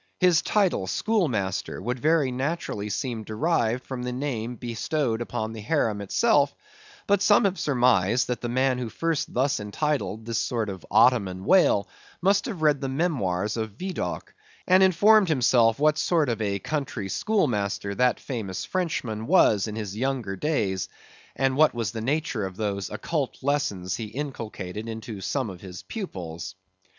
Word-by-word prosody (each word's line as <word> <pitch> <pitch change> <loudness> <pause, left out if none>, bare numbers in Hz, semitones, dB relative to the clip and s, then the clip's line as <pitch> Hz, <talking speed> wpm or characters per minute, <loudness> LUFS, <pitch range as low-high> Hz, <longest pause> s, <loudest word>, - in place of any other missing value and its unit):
His 180 -3 +4
title, 190 - +1
schoolmaster, 125 - -1
would 125 +6 -3
very 150 -2 +2
naturally 130 -6 -3
seem 115 +1 -3
derived 120 +1 0
from 130 -2 -5
the 125 0 -3
name 125 -3 -3
bestowed 120 +1 -2
upon 110 -1 -3
the 110 - -7
harem 110 -4 0
itself, 145 - +2 0.5
but 200 -1 +2
some 205 0 +5
have 195 -1 0
surmised 125 -5 +3
that 125 - -3
the 120 - -3
man 130 +1 +1
who 120 -2 -3
first 165 +4 -2
thus 130 +1 +1
entitled 110 0 -2
this 115 0 -1
sort 115 -4 -1
of 95 -2 -7
Ottoman 100 -5 +3
whale, 180 - +4 0.3
must 195 +3 +2
have 190 -10 -5
read 150 -2 +3
the 135 - -2
memoirs 115 - -1
of 110 -2 -4
Vidocq, 130 - -4 0.3
and 185 +1 +5
informed 195 +2 +5
himself 120 -5 +4
what 150 +1 +3
sort 160 -6 +2
of 115 -2 -2
a 100 -2 0
country 125 -3 -3
schoolmaster 100 - 0
that 125 +3 +2
famous 110 -8 -4
Frenchman 125 - -2
was 115 - +4
in 105 - -5
his 105 -3 -5
younger 125 -4 -2
days, 95 - -1 0.5
and 135 -1 +1
what 155 -2 +4
was 115 -5 -2
the 110 -1 -5
nature 130 -5 -1
of 95 0 -11
those 100 -2 -2
occult 150 -6 -3
lessons 105 -11 -1
he 115 - -4
inculcated 110 -5 -6
into 110 -2 -6
some 130 +4 -1
of 90 - -11
his 90 -2 -9
pupils. 95 - -6
120 Hz, 160 wpm, -26 LUFS, 105-150 Hz, 0.5 s, some